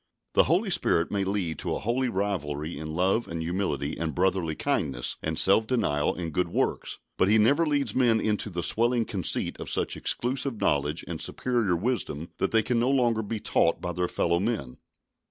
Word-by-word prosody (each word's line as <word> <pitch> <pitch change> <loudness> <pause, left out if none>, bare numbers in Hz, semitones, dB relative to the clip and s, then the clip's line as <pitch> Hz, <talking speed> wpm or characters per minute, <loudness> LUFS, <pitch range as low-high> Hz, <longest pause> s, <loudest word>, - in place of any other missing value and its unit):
The - - +5
Holy 190 +5 +1
Spirit 85 - +2
may 100 -1 0
lead 95 -5 -2
to - - -2
a - - -3
holy 120 +3 0
rivalry 85 -7 -2
in 80 +1 -6
love 95 +6 +1
and 85 - -5
humility 80 -4 -2
and 80 -3 -3
brotherly 90 -3 +1
kindness 65 -4 -1
and 80 0 -2
self 95 +7 +5
denial 75 - +1
and 85 -3 -5
good 90 +2 +1
works, - - -1 0.2
but 95 - +3
He 110 - +5
never 140 +10 +4
leads 140 -7 0
men 120 -4 +3
into 105 0 -1
the 85 -2 -4
swelling 120 +3 +2
conceit 95 -6 -1
of - - -6
such - - -1
exclusive 125 -1 -1
knowledge 75 +2 0
and 85 -2 -5
superior 120 -8 0
wisdom 90 - -2
that 95 - +1
they 110 -1 +3
can 120 0 0
no 120 +2 +2
longer 120 -5 +2
be 110 +1 -4
taught - - +1
by 90 - -3
their 90 +1 -1
fellow 85 0 0
men. 100 - -2
95 Hz, 190 wpm, -27 LUFS, 85-115 Hz, 0.2 s, The